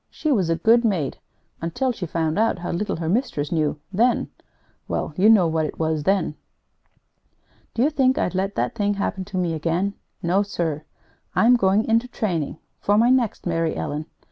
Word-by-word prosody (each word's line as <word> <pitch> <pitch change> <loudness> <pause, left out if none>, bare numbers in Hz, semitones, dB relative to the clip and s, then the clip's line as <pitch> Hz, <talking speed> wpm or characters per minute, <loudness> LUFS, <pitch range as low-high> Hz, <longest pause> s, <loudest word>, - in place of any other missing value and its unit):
She 310 - -2
was 190 -10 +2
a 165 - +2
good 225 +8 +4
maid 180 - 0 0.4
until 170 +11 -1
she 195 -7 -5
found 160 +2 -1
out 225 -2 +2
how 175 - -4
little 205 +5 -2
her 165 -1 -4
mistress 190 - -1
knew; 155 -3 0
then 235 +5 +2 0.6
well, - - -2
you 200 +5 +5
know 210 -5 +6
what 160 -1 0
it - - -8
was 155 -2 -1
then. 195 -5 +1 1.4
Do 235 - +2
you 295 - +3
think 265 -3 +2
I'd 180 - 0
let 195 +2 -1
that - - -1
thing 205 -2 0
happen 195 -1 -2
to 195 -1 -6
me 175 -2 0
again? 170 +5 -1 0.3
No, 180 +4 +2
sir! 165 -7 -3 0.5
I'm 245 +2 +5
going 200 -1 +2
into 230 +2 +2
training 175 - -2 0.2
for 205 +1 +2
my 235 +3 +5
next 250 -5 +1
Mary 165 -2 0
Ellen!" 150 +2 -4
190 Hz, 185 wpm, -23 LUFS, 165-225 Hz, 1.4 s, know